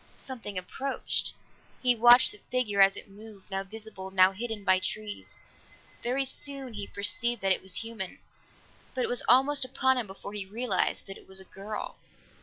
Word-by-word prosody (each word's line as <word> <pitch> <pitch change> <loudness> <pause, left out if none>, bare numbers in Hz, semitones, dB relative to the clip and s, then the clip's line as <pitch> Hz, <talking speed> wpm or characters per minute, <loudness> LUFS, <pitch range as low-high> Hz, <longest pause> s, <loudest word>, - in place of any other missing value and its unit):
Something 225 -7 -6
approached. 265 +9 -2 0.5
He 250 -1 +5
watched 240 +2 +7
the 210 - -11
figure 210 -4 0
as 195 0 +6
it - - -8
moved, 205 0 -14
now 195 0 -1
visible, 210 -2 -8
now 185 0 +5
hidden 220 +1 -5
by 185 -1 +4
trees; 210 +2 -4 0.6
very 260 +3 0
soon 270 -2 -3
he 205 -1 -5
perceived 220 +4 0
that 195 - +3
it - - -3
was 190 -1 -1
human, 225 -5 -5 0.8
but 255 - 0
it - - 0
was 245 - +3
almost 270 +3 +5
upon 260 0 +2
him 230 - -3
before 195 +1 -8
he 205 -1 -2
realized 235 +5 0
that 195 - -7
it - - -19
was 190 0 -2
a 190 - -8
girl. 205 +3 -6
215 Hz, 180 wpm, -29 LUFS, 195-250 Hz, 0.8 s, watched